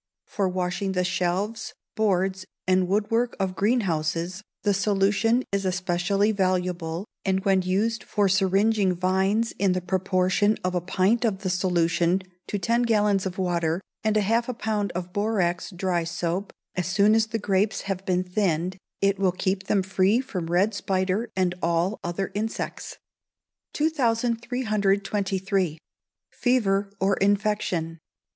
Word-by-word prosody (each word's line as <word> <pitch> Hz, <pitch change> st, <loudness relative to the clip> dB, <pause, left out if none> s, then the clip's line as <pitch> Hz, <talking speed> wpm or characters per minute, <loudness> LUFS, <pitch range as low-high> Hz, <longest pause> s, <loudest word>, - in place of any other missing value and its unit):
For 195 Hz, -2 st, -1 dB
washing 185 Hz, +1 st, -2 dB
the 180 Hz, -1 st, +1 dB
shelves, 185 Hz, +4 st, -2 dB, 0.2 s
boards, 190 Hz, -3 st, +1 dB, 0.2 s
and 185 Hz, 0 st, +3 dB
woodwork 225 Hz, +5 st, +1 dB
of 190 Hz, -1 st, -1 dB
greenhouses, 185 Hz, -4 st, 0 dB, 0.2 s
the 205 Hz, -, +3 dB
solution 200 Hz, +4 st, +2 dB
is 200 Hz, 0 st, 0 dB
especially 185 Hz, +2 st, +1 dB
valuable, 180 Hz, -3 st, -1 dB, 0.2 s
and 190 Hz, +1 st, 0 dB
when 190 Hz, -1 st, +4 dB
used 205 Hz, +6 st, 0 dB
for 205 Hz, -1 st, +1 dB
syringing 195 Hz, +1 st, +2 dB
vines 190 Hz, +5 st, +1 dB
in 195 Hz, -2 st, +3 dB
the 185 Hz, -, 0 dB
proportion 185 Hz, +3 st, +1 dB
of 180 Hz, 0 st, -1 dB
a 180 Hz, -, 0 dB
pint 190 Hz, +6 st, +1 dB
of 205 Hz, -4 st, -1 dB
the 185 Hz, -, 0 dB
solution 175 Hz, 0 st, +1 dB, 0.2 s
to 205 Hz, -, -2 dB
ten 230 Hz, +4 st, +1 dB
gallons 210 Hz, -4 st, +2 dB
of 185 Hz, -, -7 dB
water, 170 Hz, -3 st, 0 dB, 0.2 s
and 215 Hz, -1 st, +1 dB
half 230 Hz, +4 st, +1 dB
a 250 Hz, -, -3 dB
pound 215 Hz, -3 st, -1 dB
of 180 Hz, 0 st, -5 dB
borax 195 Hz, -4 st, 0 dB
dry 180 Hz, -2 st, -1 dB
soap, 170 Hz, +3 st, -3 dB, 0.2 s
as 180 Hz, -3 st, -2 dB
soon 200 Hz, +3 st, +4 dB
as 220 Hz, 0 st, +3 dB
the 225 Hz, +1 st, -2 dB
grapes 200 Hz, 0 st, 0 dB
have 195 Hz, -1 st, -4 dB
been 185 Hz, -2 st, +1 dB
thinned, 180 Hz, -1 st, -1 dB, 0.3 s
it 195 Hz, 0 st, +2 dB
will 190 Hz, -2 st, +3 dB
keep 190 Hz, +1 st, -2 dB
them 195 Hz, -2 st, +2 dB
free 190 Hz, +4 st, +2 dB
from 205 Hz, -11 st, -4 dB
red 185 Hz, +6 st, +2 dB
spider 195 Hz, +3 st, -1 dB
and 180 Hz, -1 st, +2 dB
all 170 Hz, +5 st, 0 dB
other 185 Hz, +2 st, -3 dB
insects. 220 Hz, +2 st, -4 dB, 0.8 s
2323. 215 Hz, -, 0 dB, 0.5 s
Fever 205 Hz, -6 st, +1 dB
or 195 Hz, +1 st, +2 dB
Infection. 195 Hz, -5 st, 0 dB
195 Hz, 140 wpm, -25 LUFS, 180-210 Hz, 0.8 s, when